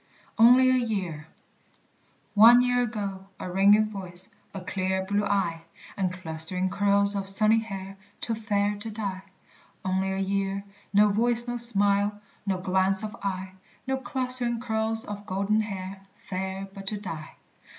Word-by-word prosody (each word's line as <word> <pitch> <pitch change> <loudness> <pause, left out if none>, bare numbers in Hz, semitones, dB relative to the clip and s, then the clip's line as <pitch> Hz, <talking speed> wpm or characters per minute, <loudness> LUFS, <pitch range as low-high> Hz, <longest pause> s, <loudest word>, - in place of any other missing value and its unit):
"ONLY 250 +3 +7
A 255 -1 +2
YEAR." 180 -9 -4 1.1
One 235 +4 +8
year 245 0 +2
ago, 200 -5 -4
a 180 - -6
ringing 205 +3 +4
voice, 185 -2 -5 0.2
A 195 - -6
clear 190 0 -2
blue 205 +1 0
eye, 195 -5 -1 0.3
And 190 -2 -1
clustering 180 +1 -2
curls 200 0 +5
of 195 -1 -1
sunny 215 +3 +4
hair, 195 -3 -7 0.2
Too 230 - -3
fair 205 -2 -1
to 215 +2 -6
die. 200 -3 -4 0.6
Only 190 0 0
a 190 - -2
year, 195 0 -2 0.3
no 210 +1 +5
voice, 235 +3 +2
no 240 - -3
smile, 205 -3 +1 0.3
No 190 -1 0
glance 190 +2 +4
of 215 +1 -5
eye, 190 -1 -4 0.3
No 265 0 -1
clustering 255 -2 -2
curls 225 -1 -1
of 205 0 -8
golden 200 +3 0
hair, 195 -2 -6
Fair 190 +1 -5
but 195 0 -10
to 210 - -1
die! 165 -6 -8
200 Hz, 150 wpm, -26 LUFS, 190-220 Hz, 1.1 s, One